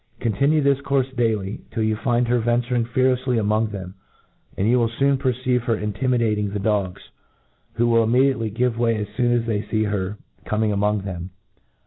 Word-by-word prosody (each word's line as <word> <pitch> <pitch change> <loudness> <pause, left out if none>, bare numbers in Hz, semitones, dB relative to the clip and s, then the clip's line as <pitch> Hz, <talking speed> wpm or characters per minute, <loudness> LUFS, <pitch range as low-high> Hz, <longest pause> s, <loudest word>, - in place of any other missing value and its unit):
Continue 140 +7 +2
this 140 -1 +3
courfe 135 -2 -1
daily, 110 -5 -1
till 110 -1 -2
you 110 0 +1
find 120 +2 +1
ter 120 +1 +1
venturing 120 +1 0
fearlefsly 130 0 +1
among 110 +1 +1
them, 95 -3 -7 0.6
and 100 - +1
you 125 +2 +4
wfll 115 -1 +2
foon 140 0 +3
perceive 130 -2 0
her 115 -2 +1
intimidating 105 -1 0
the 100 - -4
dogs, 100 -2 -2 0.6
who 120 - +1
wiH 115 -1 +3
immediately 125 -1 +2
give 120 +2 -1
away 115 -1 +2
as 105 -1 -3
foon 120 -1 +1
as 120 -1 +1
they 110 -3 -1
fee 110 0 -1
her 105 -1 -2 0.3
coning 110 0 0
among 105 0 +1
them. 90 -2 -6
115 Hz, 175 wpm, -22 LUFS, 105-125 Hz, 0.6 s, you